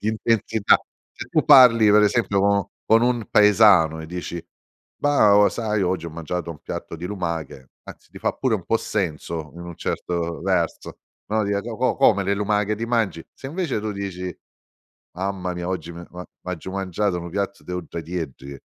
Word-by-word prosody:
di 105 - -2
intensità. 110 -1 +2 0.4
Se - - -8
tu 155 - +1
parli, 125 -7 +7
per 105 +1 +6
esempio 105 -2 +2
co 100 -1 +1 0.2
con 115 +1 +5
un 120 -3 +1
paesano 100 -6 +5
e 80 - -8
dici: 85 0 -6 0.6
"Bah, 125 -9 +4
o 105 0 +6
sai 110 -3 -1
oggi 90 -2 -1
ho - - -6
mangiato 85 +1 -5
un 75 - -9
piatto 85 - -6
di 85 - -8
lumache," 85 -9 -5 0.2
anzi - - -13
ti - - -11
fa - - 0
pure 130 -4 0
un 95 -5 -4
po' 115 - +2
senso 85 -6 -3
in 85 - -10
un 85 -1 -9
certo 85 -3 -3
verso, - - -1 0.3
no, 110 0 +1
dire: 100 0 0
"Co 115 -1 -6
co 130 +2 +1
come? 105 -7 +4
Le 100 +1 +1
lumache 105 +1 0
ti 115 +2 -4
mangi?" 110 -8 0
Se 135 - -9
invece 165 -5 -2
tu 110 0 -3
dici: 90 -3 -5 0.8
"Mamma 95 -1 -3
mia, 90 0 -4
oggi 85 -2 -4
mi 85 - -9
è - - -12
u 90 - -12
a 90 - -6 0.2
m'aggiu 90 0 -5
mangiato 95 -1 -1
nu 85 - -7
piatto 100 +1 -3
de 90 - -7
uddratieddri" 80 -5 -6
100 Hz, 190 wpm, -23 LUFS, 85-110 Hz, 0.8 s, parli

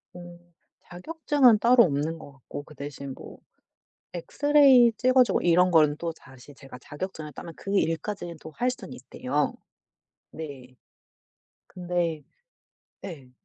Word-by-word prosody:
어 175 -1 -11 0.4
자격증은 270 - +2
따로 240 +2 +6
없는 155 0 -1
것 145 - -12
같고 135 +1 -9
그 150 - -16
대신 140 -1 -7
뭐 - - -12 0.7
엑스레이 270 - +4
찍어 255 +3 +4
주고 210 -6 -1
이런 180 +1 +3
거는 155 -3 +4
또 170 +1 -3
다시 130 -2 -16
제가 135 -2 -13
자격증을 155 +1 -7
따면 165 - -9
그 195 +1 -4
일까지는 170 +1 -2
또 160 - -11
할 245 +9 -1
수는 255 - -7
있대요. - - -3 0.8
네. 135 -5 -9 0.9
근데 175 -3 -3 0.8
네. 140 -9 -10
170 Hz, 245 characters per minute, -26 LUFS, 145-215 Hz, 0.9 s, 따로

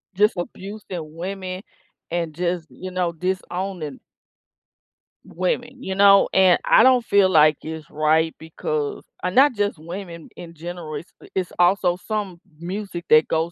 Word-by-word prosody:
Just 210 +3 +3
abusing 180 -4 -7
women, 185 +1 -5 0.5
and 170 -2 -2
just, 175 -1 -2
you 185 0 -8
know, 180 -2 -1
disowning 180 -3 -4 1.3
women, 245 +9 -3
you 190 - -3
know, 200 0 +6
and 185 -2 +6
I - - +6
don't 250 -1 +5
feel 200 -2 +4
like 155 -3 +5
it's 160 -1 -7
right 155 +1 +2
because 155 -2 -4 0.2
and 180 0 -2
not 270 0 +6
just 205 -3 -1
women 170 +1 -8
in 170 -1 -10
general, 165 -1 -7
it's, 150 +4 -8
uh - - -14
it's 185 -2 -1
also 180 0 +3
some 205 -5 -3 0.2
music 180 0 -6
that 155 0 +6
goes 165 +1 0
180 Hz, 145 wpm, -22 LUFS, 160-195 Hz, 1.3 s, know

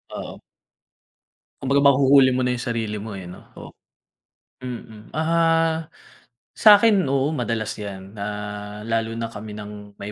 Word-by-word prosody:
Oo. - - -7 1.2
Kumbaga 135 +1 +2
mahuhuli 135 -1 +5
mo 130 0 0
na 125 - +1
yung 120 - -4
sarili 110 -3 -3
mo 105 -2 -7
eh 90 - -8
no? 90 - -12
O - - -10 0.9
mm, 115 -3 -9
ah, 165 0 +1 0.6
sakin 210 -2 +6
oo 140 +2 +1
madalas 115 -3 -2
yan 100 0 -8
na 100 - -4 0.6
lalo 115 0 -1
na 115 0 -3
kami 105 0 -8
ng 105 -1 -10
may 100 +1 -6
115 Hz, 135 wpm, -23 LUFS, 105-140 Hz, 1.2 s, sakin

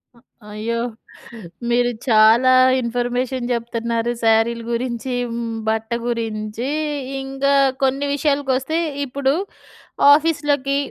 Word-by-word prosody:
అ - - -21 0.3
అయ్యో! 225 +2 -3 0.9
మీరు 245 0 +2 0.2
చాలా 225 +3 +5 0.3
ఇన్ఫర్మేషన్ 245 +1 -2
జెప్తన్నారు 235 0 -2
సారీలు 225 +1 +2
గురించీ, 240 +1 -3 0.2
హ్మ్, 230 -1 -4
బట్ట 220 0 -2 0.2
గురించీ. 225 0 -3 0.5
ఇంగా 270 +1 -1 0.3
కొన్ని 270 +2 +1
విషయాలకొస్తే, 285 0 0 0.3
ఇప్పుడు 275 +1 0 0.8
ఆఫీస్‌లకి 290 -3 +1
245 Hz, 90 wpm, -20 LUFS, 230-270 Hz, 0.9 s, చాలా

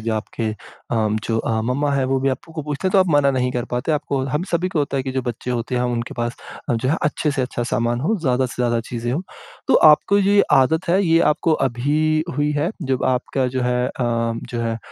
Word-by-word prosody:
जो 115 - +1
आपके 110 +1 -3 0.4
अम, 110 -2 +1
जो 115 -1 0
अ, 110 0 -1
मम्मा 140 +5 0
है 135 -1 +1
वो 135 0 +1
भी 135 - +1
आपको 155 +4 -4
पूछते 150 +4 -3
हैं, - - -5
तो 200 - +5
आप 185 - +4
मना 145 -2 +4
नहीं 125 -1 0
कर 120 -2 -2
पाते 125 +6 0
आपको 140 -2 -1
हम 150 +4 -1
सभी 175 +2 +1
को 170 - -2
होता 140 -1 -1
है 135 - 0
कि 130 0 -4
जो 130 - -1
बच्चे 120 0 -4
होते 120 +1 -2
हैं 125 - +1
उनके 120 -1 -2
पास 120 0 -3 0.3
अ, 120 - +2
जो 115 +3 -1
है 155 - +2
अच्छे 150 +1 0
से 140 -2 -1
अच्छा 125 -1 -3
सामान 120 0 -1
हो, 200 - +1
ज़्यादा 130 -3 +1
से - - -9
ज़्यादा 120 -1 +1
चीज़ें 120 0 -3
हो। 160 - -1 0.5
तो - - +4 0.2
आपको 200 +6 +3
ये 200 +1 +4
आदत 160 +7 +3
है 185 +4 +3
ये 165 0 +4
आपको 160 +2 0 0.2
अभी 155 +6 +1
हुई 145 0 +1
है, 150 +4 0
जब 135 -3 -1
आपका 130 +1 0
जो 125 - 0
है 125 0 +1
अ, - - -5
जो 115 0 -2
है 115 -1 -2
130 Hz, 245 wpm, -21 LUFS, 120-150 Hz, 0.5 s, तो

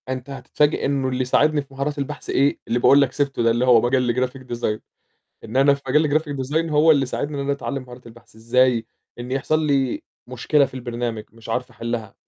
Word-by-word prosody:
أنت 130 +1 -5
هتتفاجئ 140 +2 0
إنه 135 -1 0
اللي 130 0 -2
يساعدني 145 +4 +2
في 135 -1 -16
مهارات 140 +2 -3
البحث 140 -1 -5
إيه، 140 +2 +2
اللي 120 - 0
باقول 140 +3 +6
لك 135 -2 +1
سِبته 140 -4 -1
ده 115 - +4
اللي 120 +2 +1
هو 120 -3 +6
مجال 120 -1 +1
graphic 130 0 -14
design، 110 -2 -2 0.6
لإن 115 - -6
أنا 140 +1 +5
في 140 - -11
مجال 150 +2 +3
graphic 145 -3 -6
design 160 +3 0
هو 150 +2 +5
اللي 140 -3 +4
ساعدني 145 +3 -4
إن - - -3
أنا 140 - 0
أتعلّم 140 -1 -4
مهارات 125 -1 -13
البحث 115 -1 -16
إزاي، 115 0 +2 0.3
إن 120 +1 -7
يحصل 155 +4 0
لي 135 -3 0 0.2
مشكلة 130 +4 +2
في 135 - -7
البرنامج 120 -3 -4
مش 115 0 -15
عارف 125 +2 -2
أحلّها، 115 -4 -5
130 Hz, 210 wpm, -22 LUFS, 120-140 Hz, 0.6 s, باقول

